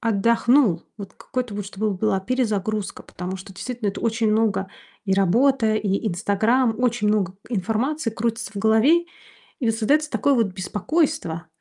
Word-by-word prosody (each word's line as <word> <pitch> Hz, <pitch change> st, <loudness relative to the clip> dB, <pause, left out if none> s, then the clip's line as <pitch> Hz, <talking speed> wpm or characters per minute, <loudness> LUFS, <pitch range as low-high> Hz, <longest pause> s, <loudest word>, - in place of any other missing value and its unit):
отдохнул. 230 Hz, -, +3 dB, 0.2 s
Вот, 195 Hz, -2 st, -9 dB
какой-то 250 Hz, -4 st, -4 dB
вот, 205 Hz, 0 st, -4 dB
чтобы 205 Hz, +2 st, -2 dB
была 195 Hz, 0 st, 0 dB
перезагрузка. 215 Hz, -3 st, -2 dB
Потому 185 Hz, +1 st, -6 dB
что 190 Hz, +1 st, -11 dB
действительно 240 Hz, 0 st, -4 dB
это 195 Hz, -, -4 dB
очень 225 Hz, -1 st, +1 dB
много: 215 Hz, -3 st, +1 dB, 0.4 s
и 190 Hz, -, +2 dB
работа, 225 Hz, +4 st, +3 dB
и 205 Hz, +1 st, -1 dB
"Инстаграм", 220 Hz, +6 st, +1 dB
очень 240 Hz, -4 st, +1 dB
много 200 Hz, -3 st, +1 dB
информации 230 Hz, -, -1 dB
крутится 225 Hz, -1 st, -3 dB
в -, -, -10 dB
голове. 225 Hz, -, +4 dB, 0.5 s
И 240 Hz, -5 st, +1 dB
создается 285 Hz, +8 st, +1 dB
такое 285 Hz, -, +2 dB
вот 230 Hz, -5 st, +2 dB
беспокойство. 195 Hz, -, -2 dB
220 Hz, 145 wpm, -23 LUFS, 195-245 Hz, 0.5 s, голове